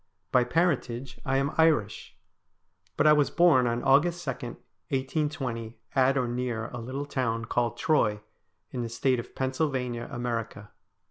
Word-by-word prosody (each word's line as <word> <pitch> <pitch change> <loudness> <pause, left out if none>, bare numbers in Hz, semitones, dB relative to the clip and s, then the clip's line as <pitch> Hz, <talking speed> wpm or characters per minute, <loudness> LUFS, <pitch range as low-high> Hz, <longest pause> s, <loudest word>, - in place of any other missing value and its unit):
By 125 -1 +4
parentage 135 -5 -1
I 135 0 +1
am 135 +2 0
Irish, 150 -11 +2 0.8
but - - +3
I 150 - +8
was 150 -2 +3
born 155 -8 +4
on 120 0 -1
August 170 +6 +3
2, 135 - 0
1820, 125 - -4 0.2
at 135 +1 +3
or 125 -2 +1
near 120 -2 -3
a 120 - -7
little 130 +5 -4
town 115 -5 -2
called 120 0 -1
Troy, 105 -10 +2 0.5
in 125 - -3
the 115 - -3
State 125 +2 +1
of 120 - -9
Pennsylvania, 130 -3 -2
America. 115 -3 -4
125 Hz, 145 wpm, -28 LUFS, 120-140 Hz, 0.8 s, I